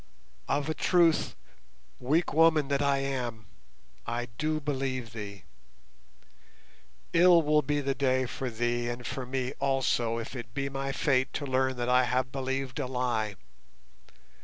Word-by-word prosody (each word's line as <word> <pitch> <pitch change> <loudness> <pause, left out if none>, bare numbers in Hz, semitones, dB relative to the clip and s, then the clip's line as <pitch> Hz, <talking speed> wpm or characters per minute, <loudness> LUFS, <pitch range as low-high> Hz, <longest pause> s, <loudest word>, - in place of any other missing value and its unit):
"Of 140 +1 0
a 160 - 0
truth, 170 -1 +3 0.6
weak 155 +7 +1
woman 155 -2 +4
that 140 0 +1
I 140 -1 +2
am, 125 -5 -3 0.6
I 120 +1 -3
do 155 0 0
believe 130 -5 -3
thee. 100 -4 -7 1.7
Ill 170 -1 +6
will 150 0 +3
be 145 -1 -1
the 135 -1 0
day 130 -1 +1
for 130 +1 -4
thee 120 +1 -1
and 120 0 -5
for 125 +1 -4
me 130 0 -2
also 125 -4 +1
if 115 +3 -6
it 115 -2 -8
be 140 0 -1
my 135 0 -3
fate 130 -2 +1
to 145 - -3
learn 130 -1 +1
that 120 0 -2
I 125 0 +4
have 130 +1 0
believed 135 0 -3
a 135 - -1
lie. 120 -5 -1
130 Hz, 150 wpm, -29 LUFS, 120-140 Hz, 1.7 s, Ill